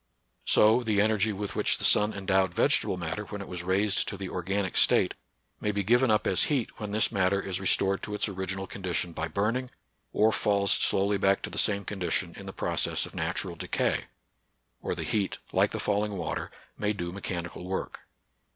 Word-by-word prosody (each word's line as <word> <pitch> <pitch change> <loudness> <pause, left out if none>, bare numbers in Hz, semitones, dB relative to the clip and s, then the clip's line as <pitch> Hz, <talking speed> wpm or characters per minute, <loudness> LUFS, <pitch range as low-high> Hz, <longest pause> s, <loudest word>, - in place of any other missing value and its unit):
So 110 +3 +5
the 110 -4 0
energy 110 0 +2
with 100 -1 -5
which - - +3
the - - -7
sun 105 +1 +6
endowed 95 -2 +1
vegetable 95 - +2
matter 85 +4 -3
when 105 0 -7
it 100 - -7
was 90 -1 -5
raised 95 +3 +1
to 100 - -5
the 95 -1 -5
or 90 - -3
ganic 95 +1 -1
state - - +4 0.5
may 105 - -1
be 100 0 -1
given 120 +5 +3
up 105 -1 +2
as 95 - +3
heat 135 -6 -2
when 105 -2 -4
this 110 +1 +1
matter 95 -2 +2
is 95 -1 -2
restored 95 0 +3
to 105 - -4
its 105 - +1
original 95 -1 -4
condition 90 -3 -3
by 80 0 -3
burning, 110 +9 -1 0.4
or 110 +1 +3
falls 100 -2 +1
slowly 100 +1 +2
back 95 +1 +2
to - - -5
the - - -2
same 100 -2 +2
con 100 0 -6
dition 85 -3 -1
in - - -10
the - - -5
process - - -1
of - - -12
natural - - -3
decay; - - -1 0.8
or - - -3
the - - -4
heat, 100 -3 -1 0.2
like - - +3
the - - -5
falling 105 0 0
water, 85 - -3 0.3
may 105 0 0
do 85 -4 -4
mechanical 90 -3 -5
work. 95 - -5
100 Hz, 200 wpm, -28 LUFS, 95-105 Hz, 0.8 s, sun